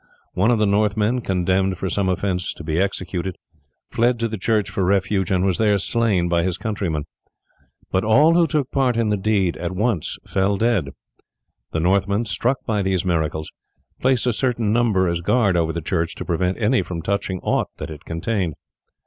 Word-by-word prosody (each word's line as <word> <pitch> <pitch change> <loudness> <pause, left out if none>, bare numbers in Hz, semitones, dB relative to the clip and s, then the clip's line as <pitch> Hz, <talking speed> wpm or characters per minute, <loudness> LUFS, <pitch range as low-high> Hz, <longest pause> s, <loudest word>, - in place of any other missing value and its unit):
One 100 +5 +2
of 120 - +3
the 105 - +2
Northmen, 105 +4 +1
condemned 95 -1 0
for 95 - -3
some 95 +1 0
offence 90 -1 -1
to - - -9
be 80 +1 -1
executed, 95 -2 -2 0.5
fled 120 +1 +2
to 115 - +2
the 110 -2 -5
church 110 +1 +1
for 95 - -2
refuge, 95 0 +1
and 95 -1 +1
was 95 -3 +1
there 105 -2 +3
slain 100 -3 +1
by 85 -1 +2
his 90 +1 -1
countrymen; 95 -8 -3 0.9
but 95 - +1
all 145 +10 +5
who 170 -1 +4
took 150 -5 -1
part 130 -4 +1
in 115 -2 +1
the 105 - +2
deed 100 -3 0
at 90 +1 -4
once 105 -3 -1
fell 100 +1 0
dead. 110 -9 +1 0.8
The 80 - -1
Northmen, 100 +5 +1
struck 120 +5 0
by 105 -3 0
these 95 -2 0
miracles, 80 -3 -1 0.5
placed 130 -2 +2
a 125 - +2
certain 115 -3 0
number 110 -6 +2
as 85 0 -1
guard 100 +1 +2
over 80 -2 +1
the 85 +1 -4
church 85 0 -1
to - - -6
prevent 90 +2 0
any 120 +3 +2
from 85 -3 -5
touching 95 -1 -2
aught - - 0
that - - -6
it 75 0 -10
contained. 85 -1 -2
100 Hz, 190 wpm, -21 LUFS, 90-110 Hz, 0.9 s, all